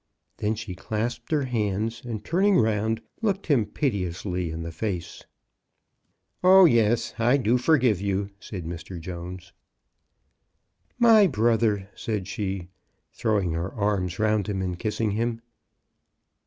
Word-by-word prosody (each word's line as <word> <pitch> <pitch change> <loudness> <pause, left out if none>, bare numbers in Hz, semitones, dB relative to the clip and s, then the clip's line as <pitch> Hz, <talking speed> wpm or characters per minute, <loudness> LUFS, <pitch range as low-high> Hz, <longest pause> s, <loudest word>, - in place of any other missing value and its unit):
Then 105 +1 0
she 105 -3 -6
clasped 110 +5 -4
her 150 -3 +2
hands, 110 -1 -2
and, 110 -4 -6
turning 190 - +3
round, 110 0 +1 0.2
looked 200 -3 0
him 130 -10 +2
piteouslyin 90 - -2
the 85 - -5
face. 90 0 -4 1.2
0h, 185 -2 +8
yes; 115 0 +2
I 120 +4 +4
do 125 -1 +2
forgive 125 - +3
you," 100 0 -1
said 95 -5 -7
Mr. 85 +1 -7
Jones. 90 +1 -8 1.4
"My 225 -4 +6
brother," 110 - +1
said 105 -4 -3
she, 95 -4 -4 0.4
throwing 105 -7 0
her 85 +3 -3
arms 100 -4 -1
round 110 -2 +1
him 95 -2 -2
and 90 -2 -3
kissing 110 +1 -1
him. 115 +2 -1
105 Hz, 125 wpm, -25 LUFS, 95-120 Hz, 1.4 s, 0h